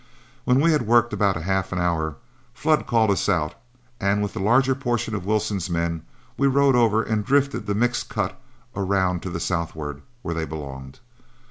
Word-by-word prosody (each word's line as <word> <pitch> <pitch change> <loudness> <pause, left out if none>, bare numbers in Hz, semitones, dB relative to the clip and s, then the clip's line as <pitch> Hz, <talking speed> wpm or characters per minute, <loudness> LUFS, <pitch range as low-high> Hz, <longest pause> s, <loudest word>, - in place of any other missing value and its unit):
When 125 +1 +4
we 165 +3 +4
had 150 -8 +1
worked 120 0 +4
about 100 -2 +2
half 95 +2 -1
an 95 - -2
hour, 80 -3 0 0.4
Flood 155 +3 +1
called 110 -3 +3
us 100 - 0
out, 80 -6 +1 0.5
and 100 +1 +1
with 100 - -3
the - - -5
larger 125 +7 +3
portion 120 -4 -2
of 100 -3 -4
Wilson's 105 -4 0
men, 85 -1 -1 0.4
we 140 - +3
rode 140 0 +4
over 115 -2 +3
and 110 -1 -1
drifted 140 -3 +1
the 100 - 0
mixed 120 +3 0
cut - - -3 0.3
around 95 -3 0
to 95 - -5
the 85 - -4
southward, 80 -5 -3 0.2
where 85 - -2
they 80 -1 -2
belonged. 70 -3 -8
100 Hz, 180 wpm, -23 LUFS, 85-120 Hz, 0.5 s, When